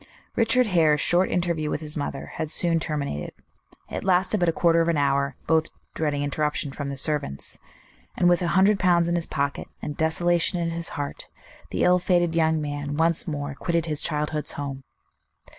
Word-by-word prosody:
Richard 250 +2 +3
Hare's 160 -7 +3
short 180 +2 +3
interview 170 -4 0
with - - -2
his 150 -1 -4
mother 145 -2 -4
had 155 - -2
soon 165 +1 +1
terminated. 140 - -3 0.6
It - - -4
lasted 190 +2 +2
but 175 -1 +3
a - - +3
quarter 170 0 +3
of 165 - +1
an 170 -2 +2
hour, 140 -1 +1
both 160 -1 +2 0.3
dreading 145 -2 -1
interruptions 145 -1 -2
from 145 -1 -4
the 140 - -5
servants; 140 - -2 0.6
and 175 - +3
with 175 0 +4
a 175 - 0
hundred 195 +1 +4
pounds 175 -2 +3
in 170 - 0
his 170 -1 -1
pocket, 140 0 -2
and 150 - -5
desolation 175 +2 +2
in 165 -1 -1
his 170 0 -4
heart, 145 -1 -5 0.4
the - - -1
ill 180 0 +5
fated 175 -2 +2
young 160 -1 +2
man 145 -1 -4
once 165 +1 +1
more 145 -2 -3
quitted 170 +3 -1
his 150 -2 0
childhood's 150 0 -2
home. 140 -2 -5
160 Hz, 185 wpm, -25 LUFS, 145-175 Hz, 0.6 s, ill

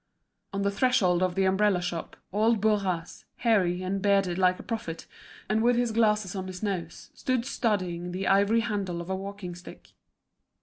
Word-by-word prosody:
On 200 0 -2
the 200 - +1
threshold 200 -6 +2
of 185 -1 +1
the 195 0 +2
umbrella 190 0 +3
shop, 175 -2 -5 0.2
old 220 +2 +3
Bourras, 195 -5 -1
hairy 185 -6 +2
and 190 +1 -2
bearded 195 -3 +2
like 185 -1 +3
a - - -10
prophet, 215 -8 -5 0.4
and 215 +2 +1
with 240 +1 +4
his 240 -1 +1
glasses 210 -4 +2
on 190 -1 -4
his 185 +2 -7
nose, 180 -5 -4
stood 255 -2 -1
studying 185 -9 -1
the 185 +2 -3
ivory 200 +4 +4
handle 200 -6 -2
of 170 +2 -5
a - - 0
walking 195 -1 -6
stick. 175 +1 -13
195 Hz, 175 wpm, -27 LUFS, 180-215 Hz, 0.4 s, with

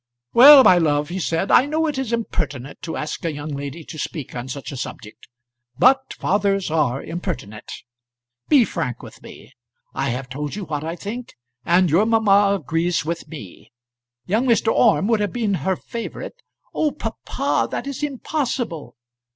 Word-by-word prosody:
"Well, 275 +2 +10
my 180 -6 +6
love," 150 -2 +1
he 185 +2 -4
said, 170 +2 -1
"I 265 - +6
know 315 +2 0
it 300 -4 -2
is 260 -4 -3
impertinent 145 - -3
to 160 - -5
ask 150 - -5
a 165 - -1
young 145 +1 -6
lady 145 +3 -6
to 155 - -9
speak 145 -5 -5
on 120 +1 -5
such 135 +2 -6
a - - -6
subject; 115 -4 -8 0.5
but 265 +1 +3
fathers 195 -3 0
are 140 -5 0
impertinent. 160 - -6 0.8
Be 275 -6 +6
frank - - -4
with - - -12
me. - - -13 0.4
I 135 - -1
have 125 +2 -4
told 145 +4 -5
you 205 -2 -5
what 150 -2 -4
I 165 +2 -4
think, 230 +7 -7 0.3
and 180 +2 +4
your 195 +7 +4
mamma 205 -3 +4
agrees 165 +2 -1
with 170 +1 -4
me. 135 - -11 0.5
Young 225 +7 0
Mr. 230 -2 +3
Orme 215 -4 +3
would 225 -2 +2
have 205 -1 -1
been 225 -5 0
her 190 0 0
favourite 230 +5 -7 0.3
" - - -41
"Oh, 310 - +1
papa, - - -2
that - - -4
is 280 0 -5
impossible." 260 - -3
180 Hz, 175 wpm, -21 LUFS, 150-230 Hz, 0.8 s, Well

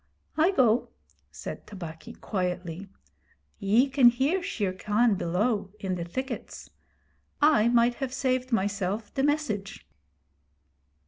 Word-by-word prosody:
'I 320 +4 +4
go,' 245 -6 +3 0.4
said - - -8
Tabaqui, 185 +2 -9
quietly. 180 -3 -4 0.7
'Ye 220 +6 +3
can 265 -3 +6
hear 275 +10 +1
Shere 205 - -2
Khan 210 +4 +2
below 195 +4 0
in 190 -2 -2
the 175 -2 -3
thickets. 260 +11 -6 0.7
I 290 -7 +5
might 240 0 +4
have 265 -2 -2
saved 255 -1 -1
myself 205 0 -1
the 270 - 0
message.' 275 -9 -1
220 Hz, 115 wpm, -27 LUFS, 195-260 Hz, 0.7 s, can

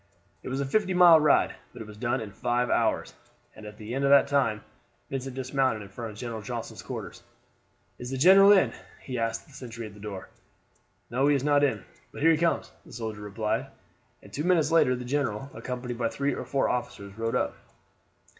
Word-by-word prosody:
It - - -7
was 135 +1 -2
a 140 - -1
fifty 190 +6 0
mile 175 -3 +8
ride; 150 -1 +3 0.2
but - - -10
it - - -13
was 105 - -11
done 120 +3 -1
in 105 -2 -7
five 120 +5 -1
hours, - - 0 0.4
and 110 -1 -10
at 105 0 -11
the 110 +2 -7
end 135 +2 -1
of 140 - +3
that 140 0 +6
time 130 -7 +1 0.5
Vincent 135 -1 -4
dismounted 130 -4 0
in 100 - -12
front 115 +3 -7
of 105 - -11
General 115 -2 -5
Johnston's 100 - -6
quarters. - - -7 0.8
"Is 125 - -6
the 135 - -3
general 195 +7 +7
in?" 195 -3 +4 0.3
he 125 -3 -5
asked 115 0 -2
the 145 - -20
sentry 115 -4 -8
at 105 - -10
the 105 - -14
door. 100 -2 -7 0.8
"No, 135 +4 +2
he 145 - +4
is 135 - -1
not 145 0 +3
in; 140 - 0 0.3
but - - -7
here 165 - +6
he 160 - +3
comes," 170 +1 0
the - - -17
soldier 110 -3 -5
replied, 105 +1 -2 0.6
and - - -16
two 150 - -3
minutes 170 -3 +2
later 145 -6 +4
the 125 0 -7
general, 135 -2 -2
accompanied 125 -1 -5
by 115 -1 +1
three 140 +3 -1
or - - -5
four 135 - 0
officers, 100 -5 -4
rode 115 +1 -2
up. - - 0
125 Hz, 210 wpm, -27 LUFS, 110-140 Hz, 0.8 s, mile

